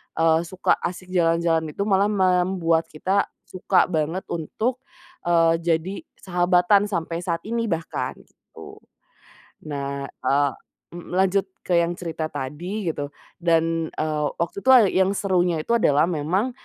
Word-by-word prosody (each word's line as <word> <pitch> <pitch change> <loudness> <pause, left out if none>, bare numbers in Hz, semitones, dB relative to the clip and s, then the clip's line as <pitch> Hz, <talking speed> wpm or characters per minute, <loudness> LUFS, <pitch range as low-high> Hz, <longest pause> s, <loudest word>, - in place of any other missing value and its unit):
eee, 165 0 +3
suka 185 +1 +1
asik 185 +1 -5
jalan-jalan 165 -2 +1
itu 200 - -1
malah 200 0 +3
membuat 180 -3 +2
kita 190 +6 0 0.2
suka 185 0 +1
banget 160 +2 -1
untuk, 220 - -2 0.5
eee, 165 -1 +4
jadi 170 +3 -1 0.3
sahabatan 180 +2 +3
sampai 170 -3 -3
saat 170 -2 -1
ini 230 0 -1
bahkan, 165 -4 -3
gitu. - - -15 0.9
Nah, 140 -1 -4
eee, 140 +1 0 0.4
m 175 0 -10
lanjut 190 +1 +2 0.2
ke 175 -2 +2
yang 170 +1 0
cerita 165 -3 -4
tadi 170 +9 -5
gitu, 145 -1 -5 0.3
dan, 165 -1 +1
eee, 150 -1 -1
waktu 170 +3 -2
itu 260 - +1 0.2
yang 190 +1 +2
serunya 180 -5 +1
itu - - -4
adalah 150 -9 +3
memang 180 - 0
170 Hz, 135 wpm, -23 LUFS, 160-190 Hz, 0.9 s, eee